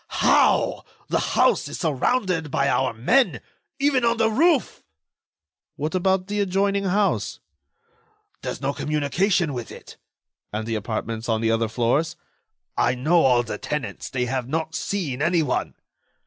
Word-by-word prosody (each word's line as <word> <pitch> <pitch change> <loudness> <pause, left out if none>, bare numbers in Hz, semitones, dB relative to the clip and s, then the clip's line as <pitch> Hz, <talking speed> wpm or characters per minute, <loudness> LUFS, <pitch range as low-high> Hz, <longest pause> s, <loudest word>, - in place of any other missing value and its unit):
How? - - +3 0.3
The - - +1 0.2
house - - +3
is - - -6
surrounded 165 - 0
by 140 0 +1
our 135 -1 +1
men—even 255 - 0
on 235 0 +2
the 225 0 +2
roof." 305 +3 +2 0.9
"What 155 +4 -3
about 190 0 +1
the 205 +1 -3
adjoining 200 +1 +1
house?" 190 - 0 1.0
"There's - - -5
no 140 +1 -1
communication 155 +3 0
with 120 -3 -6
it." - - -12 0.5
"And 110 +1 -3
the 115 - -3
apartments 110 +1 -4
on 110 -1 +1
the 115 0 +1
other 115 0 +1
floors?" 120 +8 0 0.6
"I 125 - +2
know 155 +7 +3
all 125 -4 +4
the - - -6
tenants. 150 -2 -4
They 125 -1 -1
have 125 -1 -2
not 160 +3 -2
seen 160 -7 -3
anyone." 160 -4 0
155 Hz, 140 wpm, -23 LUFS, 125-195 Hz, 1.0 s, all